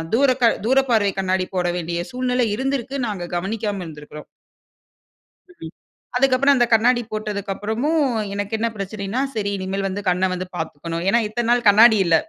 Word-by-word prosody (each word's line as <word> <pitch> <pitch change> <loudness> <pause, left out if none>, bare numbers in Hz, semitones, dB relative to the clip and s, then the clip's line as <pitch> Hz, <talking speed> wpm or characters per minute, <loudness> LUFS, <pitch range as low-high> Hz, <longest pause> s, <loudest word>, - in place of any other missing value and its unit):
தூரக 255 -2 +3 0.2
தூரப்பார்வை 240 -6 +3
கண்ணாடி 185 -1 0
போட 180 -1 0
வேண்டிய 170 0 -3
சூழ்நிலை 250 -1 0
இருந்து 270 +2 -1
இருக்கு. 265 +4 -8
நாங்க 195 -5 -4
கவனிக்காம 205 0 -3
இருந்திருக்குறோம். 150 -1 -10 1.2
ம். 170 - -11 0.4
அதுக்கப்றம் 270 +1 +4
அந்த 240 -1 +3
கண்ணாடி 240 +2 +4
போட்டதுக்கு 210 -2 -4
அப்றமும், 275 +9 0 0.3
எனக்கு 205 +2 -3
என்ன 230 +1 0
பிரச்சனைன்னா, 200 +4 -4
சரி, 200 -2 -1
இனிமேல் 195 +1 -3
வந்து 195 +2 -4
கண்ண 185 +1 +1
வந்து 185 0 -4
பாத்துக்கணும். 165 +1 -5
ஏன்னா, 235 - +4
இத்தன 230 +2 -3
நாள் 240 -3 +2
கண்ணாடி 220 +1 +6
இல்ல. 165 -1 +4
210 Hz, 150 wpm, -21 LUFS, 185-245 Hz, 1.2 s, கண்ணாடி